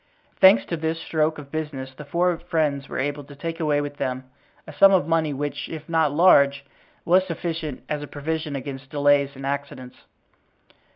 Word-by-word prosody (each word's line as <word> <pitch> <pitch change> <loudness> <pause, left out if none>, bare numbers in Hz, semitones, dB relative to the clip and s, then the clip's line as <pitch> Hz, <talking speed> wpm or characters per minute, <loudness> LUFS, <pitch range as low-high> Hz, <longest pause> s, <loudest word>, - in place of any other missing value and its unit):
Thanks 115 -12 +7
to 165 - -3
this 160 +1 -2
stroke 155 -1 0
of 140 -2 -11
business 140 -4 -5
the 150 +2 -10
four 175 +4 +1
friends 150 -5 -1
were - - -5
able 145 +2 -2
to 145 +1 -13
take 165 +4 -5
away 150 -3 +1
with 145 0 -6
them 130 -1 -3 0.4
a - - -10
sum 195 - +6
of 180 -6 +3
money 165 -2 +1
which, 145 +1 -4
if 155 -2 -8
not 160 -3 +2
large, 140 -4 +4 0.4
was 185 +2 +4
sufficient 165 -4 -4
as 150 -1 -3
a 145 - -7
provision 155 +1 -4
against 135 0 -7
delays 145 -1 +2
and 135 +1 -8
accidents. 140 -2 -5
145 Hz, 180 wpm, -23 LUFS, 140-160 Hz, 0.4 s, Thanks